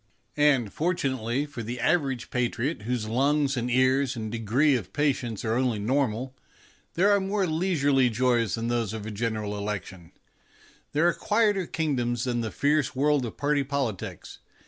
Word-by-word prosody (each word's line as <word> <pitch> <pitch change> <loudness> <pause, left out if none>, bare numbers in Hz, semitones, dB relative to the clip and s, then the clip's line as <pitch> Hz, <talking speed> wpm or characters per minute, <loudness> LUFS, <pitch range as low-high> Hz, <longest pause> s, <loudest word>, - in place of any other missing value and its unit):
And, 135 -8 +3
fortunately 135 -6 -1
for 145 -5 -7
the 120 +3 -5
average 135 -2 0
patriot 125 +2 -1
whose 120 -2 -2
lungs 140 +4 +1
and 120 0 -2
ears 130 +1 +2
and 110 -2 -5
degree 120 +6 +2
of 95 -7 -5
patience 130 -7 -1
are 110 - +1
only 125 -2 +1
normal, 130 +2 -1 0.6
there 195 +4 +4
are 200 - +4
more 195 +1 0
leisurely 155 -6 +2
joys 120 -3 +1
than 115 0 -3
those 120 -3 -1
of 110 -2 -6
a 110 - -5
General 105 -1 -2
Election; 100 -4 -5 0.8
there 155 +4 +3
are 175 - +3
quieter 210 -4 +1
kingdoms 120 -7 -1
than 120 -2 -1
the 110 - -2
fierce 145 +2 +1
world 140 -1 +2
of - - -9
party 145 0 +1
politics. 135 -8 -4
130 Hz, 160 wpm, -26 LUFS, 115-145 Hz, 0.8 s, there